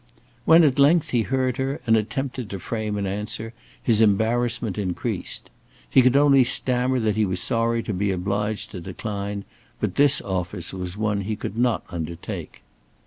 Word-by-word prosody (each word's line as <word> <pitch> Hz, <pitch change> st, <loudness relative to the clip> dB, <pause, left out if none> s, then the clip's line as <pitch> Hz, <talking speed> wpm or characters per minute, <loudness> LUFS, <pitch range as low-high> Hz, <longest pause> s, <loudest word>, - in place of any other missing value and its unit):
When 165 Hz, +1 st, +7 dB
at 140 Hz, -3 st, +2 dB
length 150 Hz, +4 st, +4 dB
he 120 Hz, -, +2 dB
heard 130 Hz, +2 st, -1 dB
her 135 Hz, +1 st, -2 dB
and 115 Hz, -2 st, +4 dB
attempted 120 Hz, +2 st, -3 dB
to 100 Hz, -, -5 dB
frame 105 Hz, +2 st, -3 dB
an 100 Hz, -, -2 dB
answer, 105 Hz, +3 st, -4 dB, 0.3 s
his 115 Hz, -2 st, +3 dB
embarrassment 110 Hz, 0 st, +1 dB
increased. 90 Hz, -3 st, -4 dB, 0.4 s
He 130 Hz, -, +5 dB
could 130 Hz, +2 st, +4 dB
only 140 Hz, -2 st, +5 dB
stammer 125 Hz, +1 st, +3 dB
that 110 Hz, -3 st, 0 dB
he 110 Hz, -, +2 dB
was 95 Hz, -3 st, -1 dB
sorry 115 Hz, +3 st, 0 dB
to 110 Hz, -, -4 dB
be 100 Hz, +2 st, -1 dB
obliged 105 Hz, +3 st, -2 dB
to 90 Hz, -, -7 dB
decline, 100 Hz, +2 st, -5 dB, 0.3 s
but -, -, -1 dB
this 145 Hz, -1 st, +5 dB
office 90 Hz, -2 st, -3 dB
was 90 Hz, 0 st, -6 dB
one 105 Hz, -2 st, 0 dB
he 105 Hz, +2 st, -3 dB
could 105 Hz, -, -6 dB
not 120 Hz, -1 st, +1 dB
undertake. 85 Hz, -1 st, -6 dB
110 Hz, 170 wpm, -23 LUFS, 100-125 Hz, 0.4 s, When